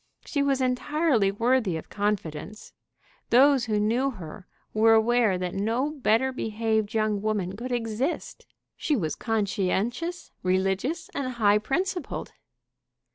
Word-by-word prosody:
She 285 - -1
was 275 -1 +1
entirely 255 -3 +1
worthy 230 -4 +1
of 160 - -10
confidence. 205 -2 -3 0.6
Those 265 0 +5
who 215 -2 0
knew 235 +6 +1
her 185 - -9 0.3
were 225 +1 +5
aware 225 -3 +3
that 180 -1 -3
no 230 +9 0
better 265 -3 +1
behaved 220 -3 -1
young 215 -2 +1
woman 200 -3 -1
could 245 +4 -6
exist. 240 +5 -3 0.3
She 300 - 0
was 160 - -1
conscientious, 220 - -1
religious, 195 - 0
and 255 -2 -3
high 210 -3 +3
principled. 355 - -3
225 Hz, 125 wpm, -26 LUFS, 205-260 Hz, 0.6 s, Those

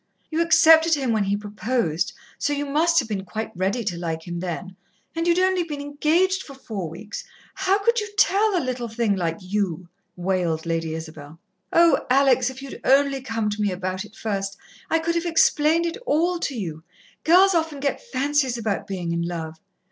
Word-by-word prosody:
You 320 +1 +1
accepted 325 -1 +6
him 265 -4 -1
when 215 -2 +1
he 200 +1 0
proposed, 210 -4 -1 0.3
so 290 - 0
you 290 0 -2
must 320 +4 +2
have 260 -8 +3
been 200 -3 -3
quite 215 +4 -5
ready 195 +6 -1
to 180 -5 -3
like 160 -1 -4
him 175 0 -4
then, 185 +1 -5 0.4
and 330 +1 -1
you'd 340 0 +3
only 370 0 +3
been 300 -4 -6
engaged 315 +7 +1
for 275 - -11
four 205 -10 -5
weeks. 205 +6 -8 0.3
How 390 0 +2
could 465 +3 +2
you 420 0 -4
tell 410 0 +3
a 330 - -1
little 250 -2 -3
thing 225 -2 0
like 165 -3 -1
you?" 185 -3 -2 0.3
wailed 175 -3 -1
Lady 165 -1 -2
Isabel. 155 -1 -9 0.3
"Oh, 335 0 +5
Alex, 260 -1 +4
if 260 +1 -9
you'd 275 - -9
only 275 0 +3
come 225 -3 -2
to 210 +1 -3
me 205 - +2
about 185 +1 -3
it 210 +1 -15
first 195 -2 -3 0.3
I 325 - +3
could 330 +1 -1
have 335 +1 -1
explained 330 0 +3
it 335 +3 -3
all 345 +1 +2
to 285 - -2
you 160 -5 -5 0.4
girls 375 +4 +6
often 320 -4 0
get 280 0 -1
fancies 280 - 0
about 215 -4 -2
being 180 -4 -3
in 170 0 -1
love." 165 -2 -5
245 Hz, 195 wpm, -23 LUFS, -, 0.4 s, accepted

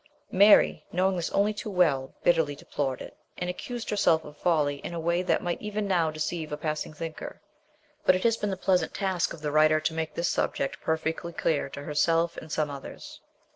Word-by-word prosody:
Mary, 200 +2 +6
knowing 185 +2 +2
this 170 -2 -2
only 205 +2 +2
too 210 +1 -6
well, 155 -9 +1
bitterly 160 -4 +3
deplored 135 -2 -3
it, - - -11 0.2
and 180 0 -2
accused 240 +5 -6
herself 165 -6 +3
of 150 - -11
folly 150 -4 +1
in 170 - -7
a - - -3
way 170 +2 +1
that 185 - +1
might 175 -1 -2
even 210 -1 -3
now 175 -4 +2
deceive 155 +1 -3
a 150 - -2
passing 155 0 -3
thinker; 160 +1 -7 0.6
but 185 - +5
it 185 - -2
has 230 -1 +4
been 210 -2 -2
the 190 - -2
pleasant 185 -1 +1
task 190 -4 0
of 155 - -9
the 150 - -1
writer 155 +1 +5
to 155 +1 -1
make 160 -1 -3
this 170 - 0
subject 135 - -1
perfectly 160 +1 -2
clear 155 -3 0
to 140 - -8
herself, 165 +3 +1
and 160 - -8
some 150 -2 0
others. 140 -1 -9
165 Hz, 205 wpm, -27 LUFS, 155-185 Hz, 0.6 s, Mary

